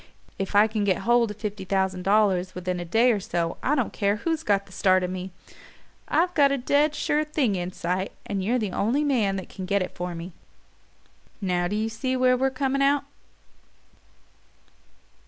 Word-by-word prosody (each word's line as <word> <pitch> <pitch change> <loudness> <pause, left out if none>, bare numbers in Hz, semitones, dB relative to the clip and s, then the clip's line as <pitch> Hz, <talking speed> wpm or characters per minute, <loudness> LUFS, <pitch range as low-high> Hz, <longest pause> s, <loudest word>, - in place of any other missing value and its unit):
If 195 +1 -3
I 205 +1 +7
can 215 -1 -2
get 190 -3 0
hold 240 -1 +3
of 210 - -7
fifty 210 -2 -5
thousand 190 -1 0
dollars 190 -2 +2
within 180 0 -3
a 175 - -5
day 230 +8 +3
or 215 - 0
so 170 -3 -2
I 290 - +1
don't 255 -6 -1
care 200 0 +1
who's 320 +8 -2
got 200 -7 +1
the 195 - -19
start 185 0 +3
of 180 - -2
me. 185 0 -5 0.8
I've 355 +2 +1
got 285 -4 +4
a 280 - +1
dead 290 +4 +2
sure 300 +1 +1
thing 295 -9 0
in 180 0 -3
sight, 185 +2 -2
and 195 -2 -3
you're 235 +6 +1
the 210 -5 -2
only 240 +11 +1
man 230 -9 +1
that 190 - -5
can 185 -2 -7
get 200 0 +1
it 185 - -6
for 175 0 -5
me. 170 +2 -7 1.1
Now 180 -3 0
do 205 - -3
you 215 +1 0
see 255 +4 -2
where 255 0 +4
we're 265 +2 +1
coming 270 +1 -1
out?" 280 +1 +3
205 Hz, 195 wpm, -25 LUFS, 185-255 Hz, 1.1 s, I